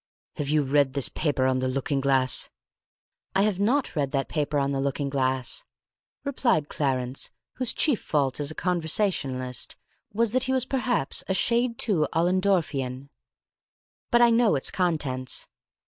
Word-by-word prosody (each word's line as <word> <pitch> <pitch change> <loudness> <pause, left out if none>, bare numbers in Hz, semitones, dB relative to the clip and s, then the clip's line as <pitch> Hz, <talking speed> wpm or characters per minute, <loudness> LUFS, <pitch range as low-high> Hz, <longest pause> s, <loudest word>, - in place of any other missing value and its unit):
"Have 145 -1 -2
you 150 0 +3
read 140 -1 +2
this 140 -2 0
paper 145 -4 0
on 130 0 +2
the 130 - 0
looking 135 +1 -1
glass?" 135 -2 +2 0.9
"I 195 - +4
have 205 -3 0
not 245 +5 +1
read 145 -3 0
that 135 -1 -1
paper 150 -1 -1
on 140 0 +1
the 135 - -1
looking 140 0 -2
glass," 130 - 0 0.6
replied 235 - +1
Clarence, 130 -2 -1 0.3
whose 255 -3 +2
chief 290 -8 +2
fault 140 -3 0
as 145 -1 -2
a 155 - -6
conversationalist 160 - 0 0.4
was 225 +1 +1
that 255 +2 +2
he 260 - 0
was 260 -1 +2
perhaps 250 - -1
a 190 - 0
shade 235 +3 +1
too 170 -10 +1
Ollendorfian. 165 -7 0 1.0
"But 240 -1 +5
I 235 - +6
know 230 -5 +4
its 135 - -1
contents." 145 -8 -1
150 Hz, 155 wpm, -26 LUFS, 135-210 Hz, 1.0 s, I